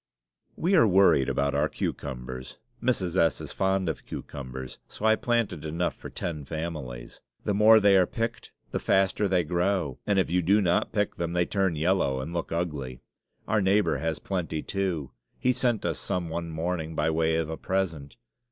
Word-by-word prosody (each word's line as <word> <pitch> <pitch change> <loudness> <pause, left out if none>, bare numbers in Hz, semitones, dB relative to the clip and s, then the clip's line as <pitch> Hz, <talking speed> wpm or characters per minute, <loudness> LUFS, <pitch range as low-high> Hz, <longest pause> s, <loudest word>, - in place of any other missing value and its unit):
We 180 +4 0
are 155 - +6
worried 95 -8 +5
about 70 0 0
our 75 +2 +1
cucumbers. 65 -1 -5 0.2
Mrs. 95 -9 0
S. 85 -4 +3
is - - -7
fond 95 -1 0
of 80 - -3
cucumbers, 65 -2 -7
so 110 - -6
I 110 0 +6
planted 115 -10 -1
enough 80 +3 -1
for - - -9
ten 80 -4 -4
families. 75 -6 -6 0.2
The 105 - 0
more 110 +2 +7
they 100 -1 +5
are 90 -2 +4
picked, 115 +1 -4 0.2
the - - -1
faster 95 +2 +2
they 90 -2 +2
grow; 90 -3 0
and 100 -1 +2
if 95 - +3
you 90 +2 +1
do 100 +5 +4
not 90 -4 +1
pick 105 -1 -1
them, 85 0 -2
they 90 0 +2
turn 95 -3 0
yellow 80 -4 +1
and 80 +6 -5
look 85 -1 -3
ugly. 75 -7 -3 0.5
Our 110 -1 +2
neighbor 100 +2 +2
has 80 -1 -1
plenty, 85 -5 -3
too. 90 -8 -2 0.3
He 125 - +2
sent 120 -3 0
us - - -1
some 85 -2 -2
one 85 +1 -4
morning, 80 0 -3
by 80 +1 +1
way 80 0 +1
of 80 -1 0
a - - -2
present. 85 -6 -2
85 Hz, 185 wpm, -27 LUFS, 80-95 Hz, 0.5 s, more